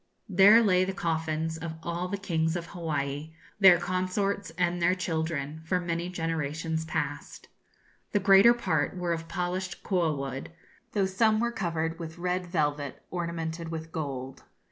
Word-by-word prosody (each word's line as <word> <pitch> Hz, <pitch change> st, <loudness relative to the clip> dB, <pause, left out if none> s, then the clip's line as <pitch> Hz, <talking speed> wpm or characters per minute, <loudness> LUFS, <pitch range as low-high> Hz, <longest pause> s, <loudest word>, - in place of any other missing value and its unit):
There 205 Hz, +4 st, +7 dB
lay 185 Hz, -3 st, +4 dB
the 190 Hz, +1 st, -3 dB
coffins 160 Hz, -3 st, -1 dB
of 160 Hz, 0 st, -5 dB
all 170 Hz, +1 st, -2 dB
the 200 Hz, +2 st, -3 dB
kings 165 Hz, -4 st, 0 dB
of 170 Hz, -1 st, -3 dB
Hawaii, 155 Hz, -3 st, -3 dB, 0.3 s
their 190 Hz, -3 st, +8 dB
consorts, 185 Hz, +2 st, -1 dB
and 175 Hz, 0 st, +1 dB
their 180 Hz, +2 st, +4 dB
children, 160 Hz, -4 st, -2 dB
for 180 Hz, +3 st, 0 dB
many 170 Hz, 0 st, -2 dB
generations 160 Hz, -1 st, -2 dB
past. -, -, -4 dB, 0.6 s
The 205 Hz, -, +2 dB
greater 195 Hz, +4 st, +7 dB
part 185 Hz, -5 st, 0 dB
were 175 Hz, -1 st, 0 dB
of 165 Hz, 0 st, -5 dB
polished 180 Hz, +2 st, -3 dB
koa 175 Hz, -5 st, +1 dB
wood, 135 Hz, -1 st, -5 dB, 0.4 s
though 200 Hz, -2 st, +2 dB
some 215 Hz, +3 st, +2 dB
were 235 Hz, +1 st, +1 dB
covered 165 Hz, -6 st, -2 dB
with 165 Hz, 0 st, -7 dB
red 180 Hz, +1 st, -1 dB
velvet 145 Hz, -5 st, -1 dB
ornamented 170 Hz, -1 st, -3 dB
with 160 Hz, 0 st, -6 dB
gold. 135 Hz, -4 st, -5 dB
170 Hz, 150 wpm, -28 LUFS, 160-185 Hz, 0.6 s, their